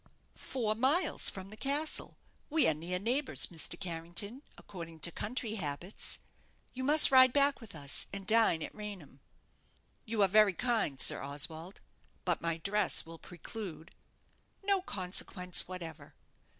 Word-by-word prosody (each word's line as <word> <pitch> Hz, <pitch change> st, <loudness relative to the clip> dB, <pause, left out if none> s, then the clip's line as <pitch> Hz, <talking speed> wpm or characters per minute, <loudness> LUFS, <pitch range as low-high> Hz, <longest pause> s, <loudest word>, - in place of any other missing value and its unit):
"Four 225 Hz, -5 st, -3 dB
miles 265 Hz, +11 st, +2 dB
from 190 Hz, 0 st, -9 dB
the -, -, -8 dB
castle. 285 Hz, +6 st, -2 dB, 0.3 s
We 315 Hz, 0 st, +3 dB
are 160 Hz, -, +3 dB
near 170 Hz, +4 st, -4 dB
neighbours, 250 Hz, +9 st, +1 dB
Mr. 170 Hz, +1 st, -2 dB
Carrington, 175 Hz, +7 st, -3 dB, 0.2 s
according 165 Hz, -4 st, -10 dB
to 170 Hz, -, -1 dB
country 220 Hz, +3 st, -3 dB
habits. 155 Hz, +6 st, -5 dB, 0.6 s
You 260 Hz, -, -5 dB
must 300 Hz, +2 st, +8 dB
ride 260 Hz, -1 st, +7 dB
back 280 Hz, -1 st, +2 dB
with 215 Hz, -6 st, -11 dB
us, 140 Hz, -2 st, 0 dB
and 195 Hz, -1 st, -7 dB
dine 215 Hz, -7 st, +3 dB
at -, -, -8 dB
Raynham." 195 Hz, -10 st, -9 dB, 0.9 s
"You 215 Hz, -2 st, 0 dB
are -, -, +4 dB
very 210 Hz, 0 st, +4 dB
kind, 225 Hz, -, -1 dB
Sir -, -, +6 dB
Oswald; 160 Hz, +6 st, 0 dB, 0.4 s
but -, -, 0 dB
my 165 Hz, -1 st, -2 dB
dress 200 Hz, +3 st, +2 dB
will 165 Hz, 0 st, -11 dB
preclude 180 Hz, 0 st, -9 dB, 0.4 s
" -, -, -38 dB
"No 395 Hz, -2 st, +3 dB
consequence 180 Hz, -, -2 dB
whatever. 165 Hz, -5 st, -9 dB
195 Hz, 145 wpm, -32 LUFS, 165-235 Hz, 0.9 s, must